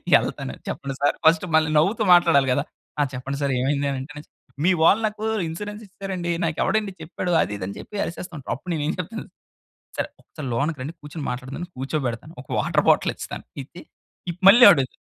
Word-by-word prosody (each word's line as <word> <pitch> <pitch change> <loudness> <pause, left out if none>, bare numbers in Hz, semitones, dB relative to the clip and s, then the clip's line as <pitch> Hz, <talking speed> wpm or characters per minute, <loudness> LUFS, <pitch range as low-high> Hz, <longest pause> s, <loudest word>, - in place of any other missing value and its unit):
యెళ్తాను. 65 - 0
చెప్పండి 135 -1 -4
sir 145 - +3
first 170 +5 +5
మళ్ళీ 160 0 +4
నవ్వుతూ 200 +8 +2
మాట్లాడాలి 140 -6 +5
గదా! - - +1 0.4
ఆ - - +5
చెప్పండి 135 +2 -4
సార్ 140 - +1
ఏమైంది 140 +2 0
అంటే, 145 +3 -7 0.4
"మీ 190 - +5
వాళ్ళు 205 +6 +5
నాకు 215 0 -7 0.2
ఇన్స్యూరెన్స్ 205 +6 -6
ఇచ్చారండి. 185 -3 -4
నాకు 160 -1 -2
ఎవడండి 210 -3 0
చెప్పాడు" 175 +2 -4
అది 105 - -1
ఇది 95 - -5
అని 100 - -6
చెప్పి, - - -10
అరిసేస్తూ 175 +1 -7
ఉంటారు. 135 - -4
అప్పుడు 180 +7 -7
నేను 150 - -2
ఏం - - 0
చెప్తాను 215 +5 -5 0.7
సర్, - - 0 0.3
సర్ 150 - -5
లోనకి 145 +4 -1
రండి 145 +5 -4
కూర్చొని 150 0 -7
మాట్లాడదాం 130 +2 -5
అని 175 - -5
కూర్చోబెడతాను. 135 +1 -3
ఒక - - -27
వాటర్ - - +1
బాటిల్ - - +4
ఇస్తాను. - - -7 0.2
ఇచ్చి 170 +6 -13 0.5
ఇ - - -2 0.2
మళ్ళీ 240 +5 +9
అడుగుతాను. 130 -2 -2
155 Hz, 190 wpm, -23 LUFS, 135-180 Hz, 0.7 s, మళ్ళీ